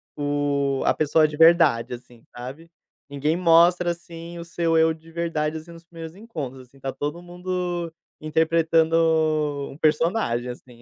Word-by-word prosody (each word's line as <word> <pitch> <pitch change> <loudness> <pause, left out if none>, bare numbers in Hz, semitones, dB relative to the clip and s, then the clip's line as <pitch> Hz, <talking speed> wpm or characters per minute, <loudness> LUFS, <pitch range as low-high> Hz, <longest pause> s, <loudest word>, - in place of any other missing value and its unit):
o 145 -1 0
a - - +4
pessoa 155 +1 +3
de 150 - -7
verdade, 160 -8 +5
assim, 120 -1 -12
sabe? 135 +7 -9 0.4
Ninguém 145 +3 -1
mostra, 175 0 +4
assim, 170 0 -9
o 170 - -6
seu 165 -1 0
eu 160 0 +4
de 160 +1 -16
verdade, 160 -2 -2
assim, 165 +2 -11
nos 165 0 -13
primeiros 165 -1 -10
encontros, 140 - -7
assim, 135 +2 -22
tá 135 0 -4
todo 150 +6 -4
mundo 175 -1 -4 0.3
interpretando 160 +1 +2 0.8
um 135 - -12
personagem, 155 - +1
assim. 120 -1 -11
160 Hz, 150 wpm, -24 LUFS, 140-170 Hz, 0.8 s, verdade